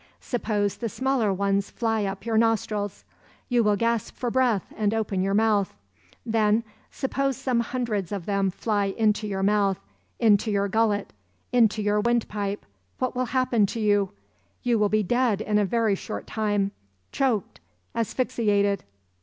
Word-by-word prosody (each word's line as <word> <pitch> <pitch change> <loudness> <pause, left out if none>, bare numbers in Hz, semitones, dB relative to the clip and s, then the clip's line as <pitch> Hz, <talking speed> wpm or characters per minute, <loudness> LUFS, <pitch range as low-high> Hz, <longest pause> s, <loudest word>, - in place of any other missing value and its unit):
Suppose 210 -4 -1
the 230 - -3
smaller 260 -4 +1
ones 200 +1 0
fly 225 -3 -1
up 195 +1 -5
your 230 -1 -1
nostrils. 215 -3 0 0.5
You 240 -2 +3
will 210 -1 +3
gasp 230 +1 -1
for 245 -2 -2
breath 245 -6 +2
and 215 0 0
open 210 -4 -1
your 195 +1 +1
mouth. 210 - +2 0.5
Then, 220 -1 +2 0.3
suppose 275 -1 -1
some 260 -3 0
hundreds 230 -6 -2
of 195 -4 -4
them 200 -1 +1
fly 205 +2 0
into 210 +1 +1
your 195 -1 -2
mouth, 200 -1 +2 0.4
into 220 -1 +3
your 200 -1 +1
gullet, 215 -1 +1 0.4
into 220 -3 +3
your 205 0 +2
windpipe, 210 -3 -1 0.3
what 255 0 -2
will 255 0 0
happen 240 -4 +2
to 230 - -4
you? 205 -2 +2 0.5
You 240 -3 +2
will 210 -1 +3
be 215 0 +2
dead 240 0 +1
in 210 -1 +1
a 205 - +2
very 225 0 +1
short 205 +3 -5
time, 205 -2 0 0.4
choked, 230 - 0 0.3
asphyxiated." 210 -4 0
215 Hz, 155 wpm, -25 LUFS, 200-235 Hz, 0.5 s, You